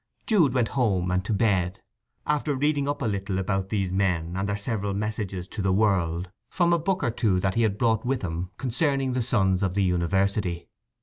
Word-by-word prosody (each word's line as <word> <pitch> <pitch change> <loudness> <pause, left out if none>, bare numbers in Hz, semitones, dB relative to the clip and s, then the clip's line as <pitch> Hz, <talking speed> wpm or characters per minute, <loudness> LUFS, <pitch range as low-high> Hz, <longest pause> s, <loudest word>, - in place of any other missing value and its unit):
Jude 165 - +3
went 120 -3 +2
home 95 -8 +1
and 90 +1 +1
to - - -3
bed, 100 -4 +1 0.5
after 150 -1 0
reading 145 +1 +1
up 145 -1 -2
a - - 0
little 100 -2 -2
about 95 0 -1
these 100 -4 -1
men 90 -3 0
and 95 +1 -1
their 100 - -1
several 100 -2 -2
messages 100 -3 -3
to 110 - -5
the 95 -1 +1
world 95 -3 +1 0.2
from 175 -1 +2
a 170 - +3
book 185 +1 -1
or 120 - +1
two 105 -5 +1
that 95 0 0
he 115 - +1
had 105 -3 +1
brought 110 -2 +2
with 125 -1 -1
him 85 0 -3
concerning 135 +1 0
the 125 - 0
sons 95 -6 +2
of 95 -2 0
the 100 - +2
university. 90 0 0
100 Hz, 205 wpm, -26 LUFS, 95-125 Hz, 0.5 s, Jude